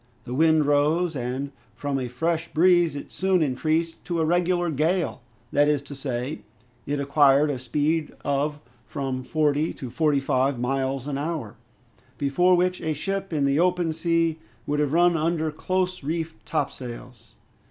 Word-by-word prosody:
The 125 - -6
wind 160 +1 +4
rose, 150 +4 +2
and 130 +2 -3 0.2
from 140 -1 -2
a 125 - -3
fresh 165 +7 -1
breeze 175 -1 +4
it 140 - -7
soon 185 -3 +2
increased 155 +4 -1
to 170 -2 -2
a 160 - +2
regular 175 +1 +1
gale; 160 +2 0 0.3
that 145 0 +4
is 150 -2 +1
to 140 - -8
say, 135 +1 -4 0.5
it 145 0 -1
acquired 140 +1 +4
a 130 - -4
speed 150 +5 0
of 145 +1 0 0.3
from 135 -4 -3
forty 150 +2 +1
to 130 -3 -7
forty 150 +1 +2
five 135 0 +1
miles 135 +1 -1
an 140 -1 -3
hour, 145 -8 -4 0.6
before 175 +6 +3
which 180 +1 +1
a 160 -1 -1
ship 195 +5 -3
in 150 -3 +1
the 140 +2 +2
open 175 -2 +2
sea 165 0 +1 0.3
would 145 0 -1
have 145 -2 +1
run 175 +1 +4
under 160 0 0
close 185 +2 -2
reefed 160 +2 -4
topsails. 125 -6 -5
150 Hz, 160 wpm, -25 LUFS, 140-165 Hz, 0.6 s, wind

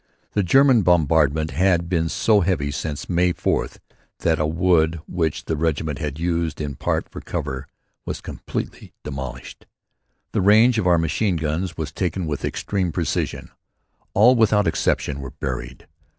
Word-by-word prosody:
The 105 - +1
German 130 +5 +5
bombardment 80 -3 +2
had 90 -1 +2
been 85 -2 0
so 105 +4 +3
heavy 85 -6 0
since 75 0 -4
May 90 0 +2
4th - - -1 0.4
that 80 -1 +2
a 75 - +1
wood 80 -1 +2
which 80 -4 -2
the 80 - -1
Regiment 80 -1 -1
had 75 -2 -4
used 85 -2 -1
in 75 -2 -3
part - - -2
for - - -9
cover 65 -1 -4 0.4
was - - -5
completely - - -6
demolished. 65 -3 -7 0.6
The - - 0
range 110 +4 +5
of 90 - 0
our 90 -1 +5
machine 85 +5 0
guns 80 +3 -2
was 80 -2 -4
taken 90 +2 -2
with 75 -3 -4
extreme 95 -4 -2
precision. - - -2 0.6
All, 115 +5 +7
without 110 -3 +3
exception, 75 -3 0
were 70 -1 -6
buried. - - -6
80 Hz, 150 wpm, -22 LUFS, 75-95 Hz, 0.6 s, All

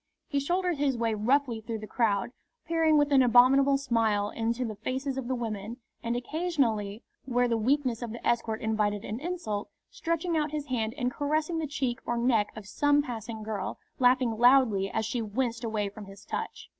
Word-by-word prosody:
He 285 - 0
shouldered 350 +2 0
his 275 -3 +1
way 230 -1 0
roughly 235 +2 +1
through 225 0 -4
the 215 - -7
crowd, 215 -2 0 0.3
peering 325 -2 +3
with 290 0 +3
an 275 -2 +6
abominable 260 +3 +5
smile 225 -6 +1
into 230 +2 -1
the 220 - -4
faces 260 +5 -3
of 265 -2 -4
the 260 - 0
women, 225 -1 -4 0.2
and 235 0 -2
occasionally, 245 - -1 0.2
where 245 -1 +2
the 235 - +1
weakness 250 +1 +1
of 235 -2 -4
the 235 - -5
escort 230 -2 0
invited 210 -2 0
an 215 +3 -4
insult, 295 - -3 0.2
stretching 335 0 -1
out 305 -1 +1
his 300 -1 -4
hand 235 -4 -2
and 250 -2 0
caressing 310 +4 -1
the 315 - -2
cheek 265 -3 -2
or 240 - -2
neck 235 -3 +2
of 215 -2 -8
some 290 +7 +2
passing 225 -3 -6
girl, 215 -2 -4 0.2
laughing 250 -1 +4
loudly 240 -6 +5
as 220 +2 -1
she 235 +2 -2
winced 235 +2 -2
away 215 -3 -1
from 205 +1 -9
his 195 +1 -13
touch. - - -5
240 Hz, 190 wpm, -28 LUFS, 220-280 Hz, 0.3 s, an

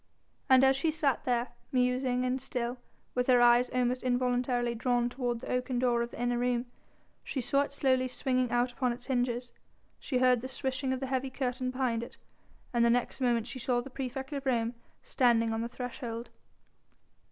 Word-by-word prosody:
And 260 0 +7
as 265 0 +5
she 275 +4 +1
sat 300 -4 0
there, 240 -1 +1 0.2
musing 250 0 +1
and 255 +1 -1
still, 245 -1 -3 0.3
with 250 0 0
her 250 -2 +6
eyes 240 +1 +5
almost 250 0 0
involuntarily 245 -1 +1
drawn 240 +1 +1
toward 245 -2 -2
the - - -5
oaken 250 0 -1
door 240 -1 +2
of 235 - -2
the - - -10
inner 245 0 0
room, 245 0 0 0.6
she 275 - -3
saw 275 +3 +2
it 285 - -2
slowly 260 -2 +2
swinging 255 -1 0
out 245 +1 +1
upon 250 0 0
its 245 +1 -10
hinges, 245 -2 -1 0.5
she 260 - -2
heard 250 -1 +4
the 260 - -5
swishing 265 0 -2
of 260 0 -2
the - - -1
heavy 260 +1 0
curtain 255 -1 -2
behind 255 -3 -1
it, 235 - -9 0.6
and 235 -1 +3
the 235 - +5
next 245 +3 0
moment 240 -3 +2
she 255 - -6
saw 245 0 +1
the 260 +2 -7
praefect 265 +1 -5
of 275 -1 -4
Rome 235 -2 +1 0.3
standing 230 -3 +2
on 225 - -1
the 235 - -3
threshold. 240 -1 -6
250 Hz, 190 wpm, -30 LUFS, 240-260 Hz, 0.6 s, And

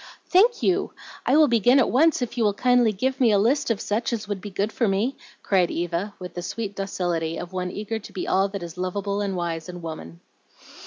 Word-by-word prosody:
"Thank 440 +7 +4
you! 380 +1 +1 0.3
I 285 - +5
will 310 -1 +6
begin 240 +1 +4
at 265 - +3
once 300 +1 +3
if 240 0 -5
you 240 - +1
will 205 -2 +2
kindly 245 -1 +3
give 260 +6 -2
me 235 -3 +5
a 205 - +4
list 250 +8 +2
of 225 -3 0
such 220 +4 -1
as 220 -3 -3
would 205 -2 -4
be 205 - -6
good 200 +2 -2
for 230 - 0
me," 210 +7 0 0.3
cried 185 -3 +2
Eva, 175 +4 -3
with 180 -2 -8
the 175 - -5
sweet 205 +3 -5
docility 175 -4 -2
of 175 +1 -7
one 180 -1 -2
eager 215 +3 -4
to 210 - -12
be 185 - -5
all 195 +1 +3
that 195 -2 -6
is 170 +1 -8
lovable 200 +2 -2
and 200 -2 -2
wise 170 -1 -3
in 175 -1 -8
woman. 85 - -7
200 Hz, 230 wpm, -24 LUFS, 180-240 Hz, 0.3 s, will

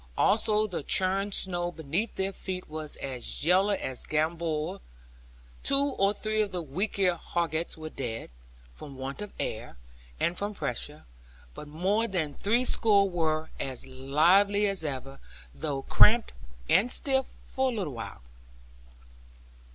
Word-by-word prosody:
Also 215 0 +3
the 185 -7 -4
churned 190 +6 +2
snow 175 -2 +1
beneath 165 +7 -2
their 195 +1 -1
feet 185 -1 -5
was 155 -1 -5
as 130 +1 -4
yellow 190 +4 +4
as 130 -8 -4
gamboge. 160 +3 -1 0.8
Two 280 0 +2
or 195 +1 +3
three 215 +1 -1
of 210 - 0
the 180 -2 -3
weaklier 185 +4 0
hoggets 170 -1 -1
were 155 0 -7
dead, 115 - -5 0.4
from 135 - -11
want 135 +6 -5
of 210 - -6
air, 110 - -4 0.4
and 170 - 0
from 205 +1 -3
pressure; 145 +2 -2 0.5
but 150 - -9
more 190 +9 0
than 165 -8 -1
three 235 - +1
score 205 -5 +4
were 160 -3 -1
as 130 -2 -4
lively 170 +11 +3
as 195 -4 0
ever; 135 -2 -4 0.3
though 140 -3 -3
cramped 225 - +5 0.3
and 240 +5 +4
stiff 265 -2 +2 0.2
for 265 0 0
a - - -5
little 180 -10 -3
while. 110 - -8
175 Hz, 140 wpm, -28 LUFS, 150-205 Hz, 0.8 s, cramped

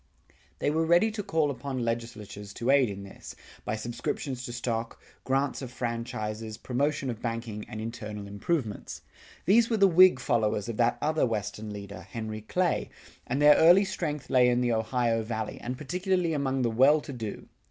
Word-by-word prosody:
They 145 - 0
were 160 +2 +1
ready 175 +7 +4
to 215 -1 -4
call 160 -7 +1
upon 130 -1 -4
legislatures 110 -3 -5
to 120 +3 +1
aid 135 -4 +4
in 100 0 -6
this, 100 - -10 0.3
by 110 - -2
subscriptions 120 +3 -4
to - - -5
stock, 115 -1 -3 0.3
grants 135 +2 0
of 130 - -5
franchises, 115 -3 -4
promotion 140 +1 -1
of 115 - -8
banking 115 -2 -4
and 110 - -6
internal 110 -2 -6
improvements. 105 - -3 0.4
These 225 +6 +5
were 225 - +1
the 200 -1 +6
Whig 185 -4 +6
followers 110 -4 0
of 115 -2 -4
that 120 0 +2
other 155 -3 +2
Western 105 -1 -4
leader, 100 0 -8
Henry 110 -1 -6
Clay, 180 - 0 0.4
and 130 +3 -1
their 150 0 +8
early 175 +5 +7
strength 155 -6 -3
lay 125 -1 +5
in 120 0 +2
the 120 -1 +2
Ohio 115 +1 +1
Valley, 110 -1 -4
and 125 +1 -4
particularly 180 +3 0
among 135 -3 0
the 120 - +1
well 135 +7 +5
to 140 - -8
do. 110 -5 -6
120 Hz, 175 wpm, -28 LUFS, 110-150 Hz, 0.4 s, their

